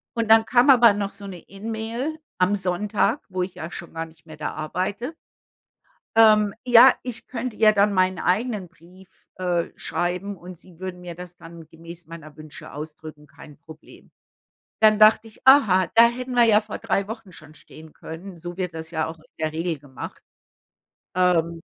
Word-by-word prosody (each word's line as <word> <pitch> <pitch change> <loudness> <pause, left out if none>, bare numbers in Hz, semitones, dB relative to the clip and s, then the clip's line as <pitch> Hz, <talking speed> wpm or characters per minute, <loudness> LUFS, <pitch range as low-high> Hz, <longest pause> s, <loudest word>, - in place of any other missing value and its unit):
Und, 230 -1 -2
dann 225 0 +7
kam 250 +4 +3
aber 240 -5 +7
noch 200 -1 -3
so 200 0 -7
'ne 185 -3 -8
E-Mail 225 +9 -5 0.2
am 185 +3 +3
Sonntag, 205 +6 -1
wo 185 -1 -3
ich 180 0 -7
ja 160 +2 -7
schon 170 - -9
gar 165 0 -4
nicht 160 0 -20
mehr 155 -2 -12
da 145 -4 -4
arbeite 195 - -4 1.0
ähm, 215 -2 +5
ja, 245 +1 +8
ich 245 -2 -6
könnte 250 -2 -5
ja 215 -1 +5
dann 205 0 +2
meinen 185 -1 +1
eigenen 210 +1 -1
Brief, 180 +2 -19 0.3
äh, 180 -2 -1
schreiben 180 +3 -3
und 180 0 -12
Sie 175 0 -16
würden 185 -1 -6
mir 175 -1 -8
das 180 0 -11
dann 165 -1 -13
gemäß 170 +1 -12
meiner 155 -2 -12
Wünsche 155 -1 -12
ausdrücken, 150 0 -10
kein 145 +1 -15
Problem. 160 0 -16 0.7
Dann 215 -1 +6
dachte 215 +1 +5
ich: 220 - -17
„Aha, 215 -10 +6
da 230 +1 +7
hätten 250 +2 -5
wir 245 -1 +5
ja 215 -2 +5
vor 215 -1 -8
3 200 0 -1
Wochen 225 -3 -8
schon 155 -3 -13
stehen 155 0 -15
können, 175 +2 -10
so 175 +2 -8
wird 180 -3 -3
das 160 0 -6
ja 160 -2 -2
auch 160 0 -8
in 155 - -22
der 155 0 -1
Regel 165 0 -2
gemacht.“ 135 -3 -10 0.9
Ähm 170 -2 +1
185 Hz, 180 wpm, -23 LUFS, 165-215 Hz, 1.0 s, ja